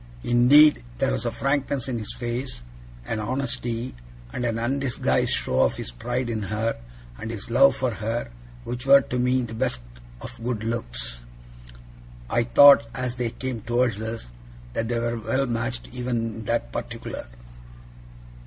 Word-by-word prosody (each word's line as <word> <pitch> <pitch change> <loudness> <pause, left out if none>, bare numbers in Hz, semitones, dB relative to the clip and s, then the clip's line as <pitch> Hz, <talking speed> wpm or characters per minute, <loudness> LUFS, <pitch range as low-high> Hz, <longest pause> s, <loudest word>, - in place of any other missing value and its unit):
Indeed, 135 - +6
there - - +1
was - - -1
a - - 0
frankness 140 +1 -1
in 125 -3 -2
his 110 - -6
face, 120 - -4 0.4
an 110 - -2
honesty, 120 0 -2 0.4
and 125 - -3
an 115 -1 0
undisguised 130 +2 0
show 65 +1 +1
of - - +2
his - - -5
pride 120 - -3
in 115 -2 -2
her, 110 +3 -1 0.4
and 110 - -5
his 115 0 -6
love 135 +3 +6
for 130 -2 0
her, 115 - -3 0.3
which 125 - -4
were, 140 0 +8
to 125 0 -3
me, 125 +1 +2
the 115 - -6
best 110 - -1 0.4
of 115 - -9
good 120 -3 -2
looks. - - -4 1.1
I 120 0 +2
thought, 130 -1 +8
as 125 -1 -3
they 120 -1 -1
came 125 -1 -5
towards 120 -2 0
us, 110 - -5 0.4
that 115 - -1
they 120 0 -1
were 115 0 -1
well 135 +4 0
matched 120 0 -3
even 125 -1 -2 0.2
in 110 0 -8
that - - -1
particular. - - -6
120 Hz, 160 wpm, -25 LUFS, 115-125 Hz, 1.1 s, were